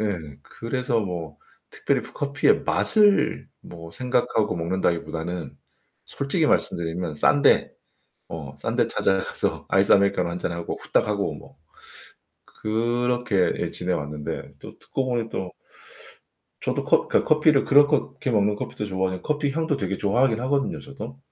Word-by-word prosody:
예 105 -3 0 0.3
그래서 120 - -2
뭐 85 -7 -5 0.3
특별히 - - 0
커피의 140 0 +1
맛을 210 -2 +3
뭐 85 -1 -11
생각하고 120 +1 0
먹는다기보다는 85 -2 -2 0.5
솔직히 150 +3 -1
말씀드리면 85 - 0
싼 70 0 +3
데 - - +4 0.6
어 75 -5 -7
싼 - - -3
데 - - +2
찾아가서 95 0 -1
아이스 95 +1 +3
아메리카노 100 -3 +3
1 85 - -4
잔하고 85 -1 -4
후딱 - - +1
하고 100 -1 -1
뭐 - - -14 0.9
그렇게 120 -2 0
예 - - -2
지내 90 +1 -3
왔는데 75 -2 -5
또 - - -11
듣고 135 - -3
보니 120 -3 -1
또 95 -1 -4 1.1
저도 - - -1
커 - - +3
그러니까 - - +2
커피를 150 -2 +3
그렇거 145 -1 +4
게 130 - -1
먹는 105 -1 +2
커피도 105 0 -5
좋아하니 95 -2 -2
커피 150 -1 -1
향도 160 -1 -1
되게 100 -1 -2
좋아하긴 115 +3 +2
하거든요 140 +2 0
저도. 130 -3 -9
105 Hz, 315 characters per minute, -24 LUFS, 90-130 Hz, 1.1 s, 데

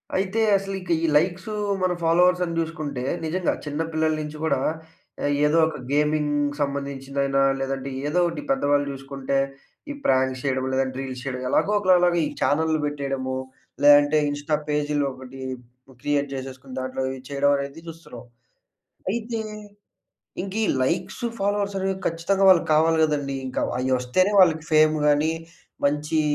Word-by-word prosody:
అయితే 195 +4 0 0.2
అసలిక 195 -2 -6
ఈ - - +3
లైక్స్, 180 +4 -1 0.4
మన 185 - +2
ఫాలోవర్స్ 180 +2 +4
అని 170 - -4
జూసుకుంటే 155 -6 -3 0.2
నిజంగా 175 +2 0
చిన్న 150 +2 -3
పిల్లల 160 0 +1
నుంచి 150 0 -6
గూడా 160 -4 +1 0.9
ఏదో 150 +2 +3
ఒక 160 - -5
గేమింగ్‌కి 145 -1 +1
సంబంధించిదైనా 140 -1 -1 0.2
లేదంటే 135 0 -3 0.2
ఏదో 160 +4 +1
ఒకటి 170 - -3
పెద్దవాళ్ళు 145 - +2
చూసుకుంటే 135 0 -3 0.5
ఈ - - -3
ప్రాంక్స్ 130 -1 +2
చేయడం. 130 -1 0
లేదంటే 130 0 0
రీల్స్ 130 -2 -6
చేయడం 130 -2 -4
ఎలాగో 205 - +2
ఒకలలాగా 180 -3 +4
ఈ - - -1
చానెల్లు 160 +1 +2
పెట్టేయడము, 135 -3 -3 0.5
లేదంటే 145 +1 +7
ఇన్‌స్టా 145 +2 -1
పేజ్‌లో 150 -1 0
ఒకటి 130 0 -11 0.6
క్రియేట్ 145 -1 0
జేసేసుకొని 130 0 -7
దాంట్లో 130 0 -4
ఇవి 130 0 -6
చేయడం 140 0 +2
అనేది 140 +3 -6
చూస్తున్నాం. 165 -7 -10 0.9
అయితే 230 +1 -3 1.0
ఇంక 190 0 -6
ఈ - - +1 0.2
లైక్స్ 185 - -2 0.2
ఫాలోవర్స్ 200 0 0
అనేవి 190 0 -1
కచ్చితంగా 180 +4 +1
వాళ్ళకి 180 -3 +4
కావాలి 160 +1 +4
గదండీ. 145 -3 -1
ఇంకా 130 - -3 0.2
అయ్యొస్తేనే 130 +9 +1
వాళ్ళకి 160 -4 +4
ఫేమ్ 155 0 +5
గాని, 150 +2 +3 0.5
మంచి 150 +2 0
145 Hz, 135 wpm, -24 LUFS, 135-165 Hz, 1.0 s, లేదంటే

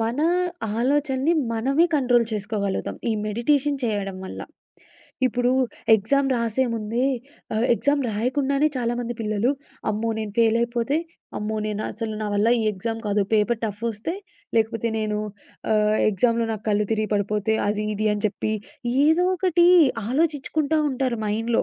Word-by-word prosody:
మన 230 +4 -1 0.6
ఆలోచనని 275 +3 +1 0.2
మనమే 270 +9 +2
కంట్రోల్ 245 -4 +3
చేసుకోగలుగుతాం, 205 -2 -2
ఈ - - +2
మెడిటేషన్ 275 +6 +1
చేయడం 205 -4 -2
వల్ల. - - -7 0.9
ఇప్పుడు 245 0 +1 0.4
ఎగ్జామ్ 270 +7 +2
రాసేముందే 230 -1 -1 0.5
ఆహ్, 225 +3 +1
ఎగ్జామ్ 285 +3 +1
రాయకుండానే 270 +7 +1
చాలామంది 240 0 -2
పిల్లలు 215 +2 +1 0.4
"అమ్మో 215 +2 -1
నేను 215 -2 -4
ఫెయిల్ 230 -1 +4
అయిపోతే, 235 +4 0 0.4
అమ్మో 215 +1 -3
నేను 210 0 -3
అసలు 220 0 -4
నా - - -2
వల్ల 210 +3 +3
ఈ - - 0
ఎగ్జామ్ 225 +4 -4
కాదు, 205 0 +2
పేపర్ 220 +2 +2
టఫ్ఫొస్తే, 220 - -3 0.4
లేకపోతే 225 +1 +1
ఆహ్, 220 - -3
నేను 210 -1 -1 0.9
ఎగ్జామ్‌లో 230 +3 +1
నాకు 215 -1 -6
కళ్ళు 210 0 +1
తిరిగి 215 -1 -1
పడిపోతే," 210 +1 0
అది 210 +1 -1
ఇది 215 0 +1
అని 210 +1 -4
చెప్పి 215 +1 -2 0.5
ఏదో 325 +3 +4
ఒకటి 350 -2 +3 0.4
ఆలోచిచ్చుకుంటా 305 +1 0
ఉంటారు 255 -2 -1
మైండ్‌లో. 225 +3 0
230 Hz, 135 wpm, -24 LUFS, 215-260 Hz, 0.9 s, ఫెయిల్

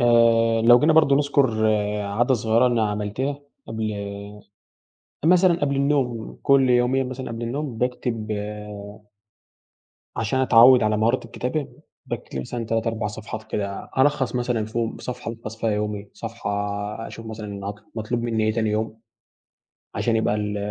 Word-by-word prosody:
آآ 115 -1 +4
لو 120 +1 +8
جينا 155 +1 +4
برضه 150 -3 +5
نذكر 135 -6 +2 0.4
عادة 115 +6 +1
صغيرة 115 +2 +3
أنا 115 -4 +1
عملتها 105 +8 -2 0.3
قبل 110 -1 -3 1.3
مثلًا 180 +1 +5
قبل 140 -1 0
النوم 135 -5 0
كل 135 -2 +4
يومين 125 +1 +2
مثلًا 130 0 -6
قبل 115 +1 -5
النوم 125 0 -3
باكتب 125 -3 -2 1.9
عشان 115 +4 0
أتعود 125 -1 +7
على 105 0 +2
مهارة 115 +3 +1
الكتابة، 125 +5 -3 0.4
باكتب 65 - -5
مثلًا 115 - -4
3 115 +1 -1
4 115 -2 -1
صفحات 110 +1 -7
كده، 100 -1 -3
ألخّص 135 -2 +2
مثلًا 120 -3 0
فيهم، 115 +1 -3
صفحة 120 -2 -5
ألخص 115 -1 -8
فيها 115 0 0
يومي، 105 -1 -3
صفحة 115 -2 -6 0.5
آآ - - -6
أشوف 115 - -10
مثلًا 105 -3 -6
أط 105 - -6 0.2
مطلوب 115 +2 -2
مني 115 -2 0
إيه 110 - +2
تاني 110 -2 0
يوم، 110 +1 -2 1.0
عشان 115 -2 +1
يبقى 110 -1 +1
ال 105 -1 -2
115 Hz, 145 wpm, -23 LUFS, 110-130 Hz, 1.9 s, لو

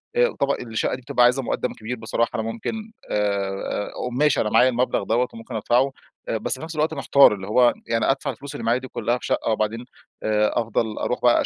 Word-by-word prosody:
آآ 485 0 +3
طبعًا 140 0 +2
الشقة 115 0 -2
دي 130 - -11
بتبقى 120 0 +2
عايزة 125 +2 +3
مقدم 125 - -2
كبير 115 +3 -5
بصراحة، 115 +1 -1
أنا 110 - -1
ممكن، 215 - -5 0.2
آآ، 100 -1 -1 0.2
ماشي 145 +4 +2
أنا 105 - 0
معايا 130 - +5
المبلغ 125 -4 0
دوَّة 120 +4 +1
وممكن 115 +1 -9
أدفعه، 120 +5 +2 0.4
بس 110 - -1
في - - -10
نفس 160 0 -6
الوقت 155 +1 +1
محتار، 140 -3 +5
اللي 95 0 -8
هو 120 +3 +4
يعني 115 +3 +2
أدفع 135 - -2
الفلوس 140 +1 -9
اللي 145 - -6
معايا 115 +2 +3
دي 130 - -8
كلها 120 0 -1
في - - -9
شقة، - - 0
وبعدين 110 +2 -1 0.4
آآ 105 0 +2
أفضل 115 -1 -1
أروح 125 - -2
بقى 120 -1 +4
120 Hz, 210 wpm, -23 LUFS, 110-135 Hz, 0.4 s, معايا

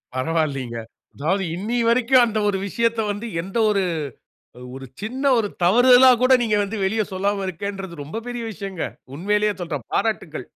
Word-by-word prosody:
பரவால்லிங்க. 135 -4 -1 0.4
அதாவது 190 +7 0
இன்னிய 230 +6 -1
வரைக்கும் 250 +2 +4
அந்த 220 -2 -2
ஒரு 195 - 0
விஷயத்த 230 +2 0
வந்து, 205 +3 -5
எந்த 195 +6 -6
ஒரு, 200 -2 +1 0.9
ஒரு 135 0 -8 0.2
சின்ன 255 +6 -4
ஒரு 215 -2 0 0.2
தவறுதலா 245 +6 +7
கூட 255 +1 +5
நீங்க 215 -2 +1
வந்து 205 +2 -5
வெளிய 215 +3 +1
சொல்லாம 195 +1 -1
இருக்கேன்ன்றது, 190 -3 -6
ரொம்ப 160 +11 -6
பெரிய 245 -1 -4
விஷயங்க. 190 -2 -5 0.3
உண்மையிலயே 210 +4 +1
சொல்றேன். 150 -8 -5
பாராட்டுக்கள். 170 - -2
200 Hz, 145 wpm, -22 LUFS, 170-230 Hz, 0.9 s, தவறுதலா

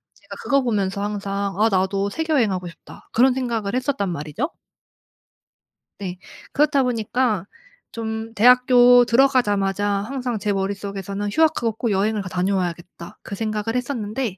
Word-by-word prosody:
제가 - - -12
그거 275 -1 +2
보면서 200 -4 -1
항상 200 -1 -3
'아 225 +1 +4
나도 195 +1 0
세계여행하고 225 - 0
싶다.' - - -15
그런 255 +2 +4
생각을 235 -4 -2
했었단 255 -7 -1
말이죠. 165 - -3 1.5
네. 180 -2 -5 0.4
그렇다 285 -1 +3
보니까 230 -4 0 0.5
좀 225 0 -5
대학교 245 +1 +6
들어가자마자 210 -6 +2
항상 235 +3 -2
제 205 0 -1
머릿속에서는 200 +1 -3
'휴학하고 305 -7 +2
꼭 225 0 -2
여행을 205 +2 0
가 185 - -7
다녀와야겠다.' 180 -2 -3
그 200 - -7
생각을 215 +1 -3
했었는데 235 -4 -3
215 Hz, 335 characters per minute, -22 LUFS, 195-250 Hz, 1.5 s, 대학교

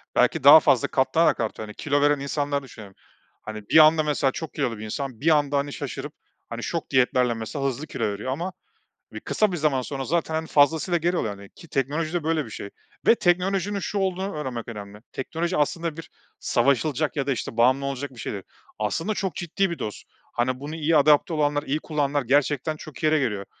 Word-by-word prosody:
belki - - +2
daha - - +11
fazla - - +3
katlanarak - - +2
artıyor, 110 - -3
hani, 105 - -10
kilo 145 -1 0
veren 145 0 +3
insanları 140 0 -2
düşünelim. 105 -7 -12 0.5
Hani, 110 -1 -8
bir - - +5
anda 155 0 +7
mesela 145 -2 +1
çok 160 +1 -6
kilolu 115 -2 -2
bir 110 - -7
insan 125 +1 -5
bir 160 - +3
anda, 145 -1 0
hani, 140 0 -2
şaşırıp, - - -6 0.4
hani, - - -6
şok - - -3
diyetlerle 125 -1 +3
mesela 115 +5 -4
hızlı 140 +3 -2
kilo - - -4
veriyor 105 +5 -2
ama 175 +7 -3 0.6
e, - - -7
kısa 215 -2 0
bir 175 - -2
zaman 150 -4 +1
sonra 135 +1 -5
zaten 160 0 -1
fazlasıyla 160 +4 +3
geri 175 +2 0
oluyor, 105 -8 -2
hani, 100 0 -13
ki 170 - -16
teknolojide 155 +5 -1
böyle 160 -2 0
bir - - -10
şey 100 -1 -7 0.4
ve - - +7
teknolojinin 190 +1 +1
şu 205 - -3
olduğunu 190 -1 -2
öğrenmek 130 -6 -4
önemli 105 -2 -8
teknoloji 165 +6 -3
aslında 165 +2 -1
bir 165 - -9 0.3
savaşılacak 145 +2 +1
ya 140 -2 -2
da - - +2
işte 120 -2 -4
bağımlı 130 +4 +3
olacak 140 0 -4
bir 125 - -14
şey - - -4
değil. 100 -2 -6 0.4
Aslında 135 - -1
çok 195 -3 -3
ciddi 190 +2 -1
bir 170 - -5
dost. 105 - -5 0.3
Hani, 130 +1 0
bunu 145 +3 -6
iyi 160 0 +2
adapte 150 +4 +4
olanlar 145 -1 +1
iyi 150 +1 -1
kullananlar 145 -2 -1
gerçekten 145 +3 +1
çok 155 -1 -11
iyi - - +3
yere 155 0 +4
geliyor. 105 -7 -2
145 Hz, 205 wpm, -24 LUFS, 130-160 Hz, 0.6 s, daha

